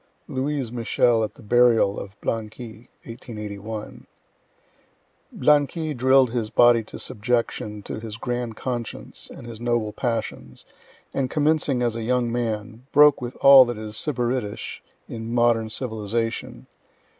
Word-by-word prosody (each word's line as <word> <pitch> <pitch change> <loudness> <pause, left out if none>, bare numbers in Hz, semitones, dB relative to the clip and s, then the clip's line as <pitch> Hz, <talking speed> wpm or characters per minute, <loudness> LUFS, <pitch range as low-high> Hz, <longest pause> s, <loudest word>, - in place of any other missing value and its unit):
Louise 135 -2 -2
Michel 120 -1 +2
at 110 - -4
the 135 - -15
burial 115 -2 +3
of 100 +1 -10
Blanqui, 110 0 -5 0.2
(1881.) 105 -2 -8 1.2
Blanqui 150 +3 +2
drill'd 130 0 +4
his 115 -3 -2
body 120 -1 +5
to - - -10
subjection 115 -3 -2
to - - -6
his 110 -1 -7
grand 120 -1 -3
conscience 120 -2 -4
and - - -11
his 115 -1 -9
noble 120 -3 0
passions, 115 -1 -4 0.5
and 135 -2 -1
commencing 150 -4 +1
as 120 -2 0
a 115 - -4
young 120 +1 0
man, 115 0 -4
broke 150 -1 +6
with 120 0 -5
all 135 -1 +10
that 120 -2 -4
is 110 -1 -7
sybaritish 125 -5 -2 0.3
in 115 0 -6
modern 120 -2 +2
civilization. 115 -1 -3
120 Hz, 130 wpm, -24 LUFS, 110-125 Hz, 1.2 s, all